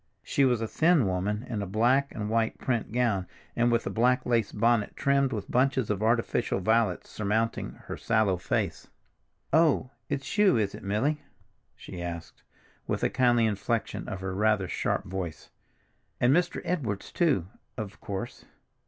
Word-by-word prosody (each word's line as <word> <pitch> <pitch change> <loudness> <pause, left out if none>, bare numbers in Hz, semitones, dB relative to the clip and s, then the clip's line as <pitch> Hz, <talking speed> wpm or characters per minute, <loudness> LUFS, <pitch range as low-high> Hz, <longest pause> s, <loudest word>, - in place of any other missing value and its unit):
She 140 - +2
was 120 -3 +2
a 115 - -1
thin 160 0 +3
woman 100 +5 -1
in 110 -4 -3
a 100 - -3
black 125 +8 +2
and 105 -1 -3
white 115 +1 0
print 120 -5 -2
gown, 110 -6 +1 0.3
and 120 0 +3
with 115 0 +1
a - - -2
black 125 +2 +2
lace 115 -4 +1
bonnet 115 0 +1
trimmed 140 -1 +2
with 105 -5 -4
bunches 130 -3 +2
of 105 -1 -2
artificial 115 -1 +1
violets 110 -1 +1
surmounting 110 +2 -1
her - - -5
sallow 110 -5 +2
face. 90 - -2 0.7
"Oh, 155 -5 +3 0.2
it's 140 +9 -3
you, 200 - +5
is 105 -3 0
it, - - -8
Milly?" 120 +10 0 0.5
she 90 - -9
asked 85 -1 -6 0.5
with - - -2
a - - +2
kindly 120 -3 +3
inflection 110 +1 -2
of 95 - -5
her 95 0 -3
rather 105 -1 +2
sharp - - -1
voice. 90 -5 -6 0.7
"And 125 +4 +4
Mr. 175 0 0
Edwards, 125 - -2
too, 150 - +2 0.3
of 105 -1 -6
course. 95 -1 -6
115 Hz, 160 wpm, -28 LUFS, 100-125 Hz, 0.7 s, you